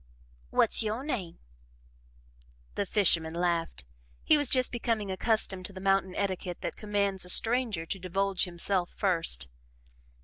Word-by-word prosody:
"What's - - +4
YO' 220 +3 -2
name?" 205 - -4 1.4
The 200 - -3
fisherman 165 -6 +2
laughed. 170 - -2 0.4
He - - +5
was 290 -3 +1
just 255 -1 +3
becoming 225 -4 -2
accustomed 190 -2 0
to 200 - -14
the 190 - -9
mountain 195 -1 +1
etiquette 185 -3 -3
that - - -4
commands 200 -2 -1
a 180 - -7
stranger 225 -5 +2
to 195 - -4
divulge 190 +1 0
himself 175 +1 -1
first. 165 - +1
195 Hz, 135 wpm, -29 LUFS, 175-215 Hz, 1.4 s, He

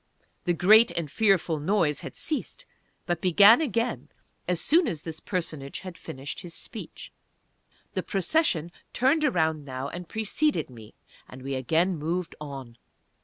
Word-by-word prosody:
The 175 - +2
great 215 +7 +6
and 160 -5 -4
fearful 195 -7 +2
noise 160 -2 +1
had - - -8
ceased, 325 - -4 0.4
but 175 -2 -2
began 200 - +7
again 230 -4 -1 0.4
as 180 -2 +1
soon 325 - +4
as 155 -3 -4
this 160 -1 -7
personage 155 -6 -4
had 185 -2 -8
finished 135 -3 -7
his 175 -2 -8
speech. - - -8 0.8
The - - -1
Procession 190 - 0 0.2
turned 275 +6 +2
around 160 - +1
now 130 0 -5
and 175 -1 -8
preceded 220 - 0
me, 110 -3 -13 0.3
and 130 0 -11
we 135 +1 -4
again 160 +7 +1
moved 170 +3 -3
on. 135 -5 -8
175 Hz, 145 wpm, -27 LUFS, 150-210 Hz, 0.8 s, began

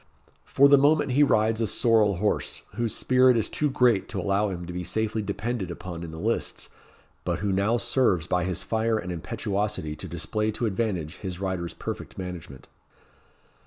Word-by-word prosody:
For 140 - +5
the 140 0 +7
moment 145 0 +3
he 135 +4 +3
rides 110 -5 +3
a 110 - +1
sorrel 110 -2 +3
horse, 105 +4 -1
whose 115 +1 -1
spirit 130 -1 +4
is 110 - +1
too 150 - -1
great 125 -6 +2
to - - -3
allow 100 +1 +1
him 90 -2 -5
to 90 - -7
be 90 0 -4
safely 110 +3 -1
depended 100 0 -3
upon 85 0 -7
in 85 - -6
the 80 - -8
lists, 110 +7 -2 0.5
but - - -1
who 100 -1 -1
now 100 +5 +2
serves 105 -10 +1
by 90 0 0
his 90 0 -2
fire 110 0 0
and 90 -4 -4
impetuosity 95 -1 -3
to - - -7
display 110 0 -2
to 120 - -2
advantage 95 -7 -2
his 95 -2 -6
rider's 95 -3 -3
perfect - - -6
management. 90 -7 -7
105 Hz, 180 wpm, -26 LUFS, 90-115 Hz, 0.5 s, the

